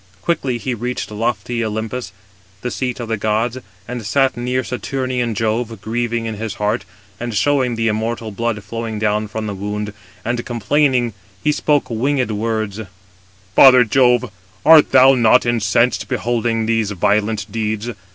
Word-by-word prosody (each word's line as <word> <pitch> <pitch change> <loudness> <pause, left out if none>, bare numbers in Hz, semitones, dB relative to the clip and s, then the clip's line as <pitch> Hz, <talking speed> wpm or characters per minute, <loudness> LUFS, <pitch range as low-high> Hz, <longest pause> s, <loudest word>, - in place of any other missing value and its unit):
Quickly 135 -7 0
he 125 +2 -3
reached 120 0 -4
lofty 115 +2 -2
Olympus, 110 0 -4 0.5
the 125 - -3
seat 125 -1 -3
of 120 - -4
the 115 -1 -1
gods, 110 +4 0 0.3
and 120 -1 -5
sat 135 +5 +2
near 125 +1 -1
Saturnian 125 -2 -2
Jove, 115 +1 -1
grieving 115 +2 -2
in 110 -2 -4
his 110 -1 -4
heart, 105 -1 -1 0.3
and 120 -2 -4
showed 130 +1 +2
the 115 0 0
immortal 110 +1 -2
blood 110 0 -2
flowing 115 -1 -5
down 105 0 0
from 110 +1 -5
the 105 - -3
wound, 105 +1 -4 0.3
and 120 +1 -1
complaining, 125 0 +1 0.3
he 150 - +3
spoke 145 -3 +1
winged 130 +1 0
words: 110 -1 -2 0.8
"Father 130 -2 +8
Jove, 125 +1 +3 0.3
art 160 -1 +7
thou 130 0 +7
not 125 0 +4
incensed 115 -1 +1
beholding 115 0 -1
these 115 -2 +1
violent 105 +1 0
deeds? 110 +1 -2
115 Hz, 150 wpm, -19 LUFS, 110-125 Hz, 0.8 s, Father